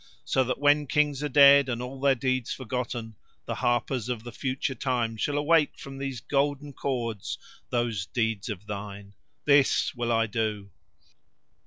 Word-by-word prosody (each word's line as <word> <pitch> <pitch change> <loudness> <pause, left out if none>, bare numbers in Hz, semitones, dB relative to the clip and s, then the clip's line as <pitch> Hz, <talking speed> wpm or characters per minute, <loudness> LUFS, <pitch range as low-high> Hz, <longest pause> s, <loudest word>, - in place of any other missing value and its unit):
So 130 - +2
that 130 - -1
when 145 +1 +3
Kings 145 0 +1
are 150 - -1
dead 140 0 +7
and 120 -2 -2
all 130 +2 -6
their 140 -1 +4
deeds 130 -1 -1
forgotten 120 -3 -4 0.3
the - - -3
harpers 120 0 0
of 120 -3 -3
the 120 - -8
future 130 +1 -2
time 120 -4 -1
shall 145 +6 -1
awake 150 0 +3
from 135 0 -9
these 135 -4 -4
golden 145 0 -1
chords 115 -7 -3 0.3
those 115 -5 -1
deeds 115 -2 -1
of 105 -1 -6
thine. 100 -1 -7 0.3
This 140 +1 +4
will 120 -2 -2
I 115 0 +3
do." 105 -3 -3
125 Hz, 160 wpm, -27 LUFS, 115-140 Hz, 0.3 s, dead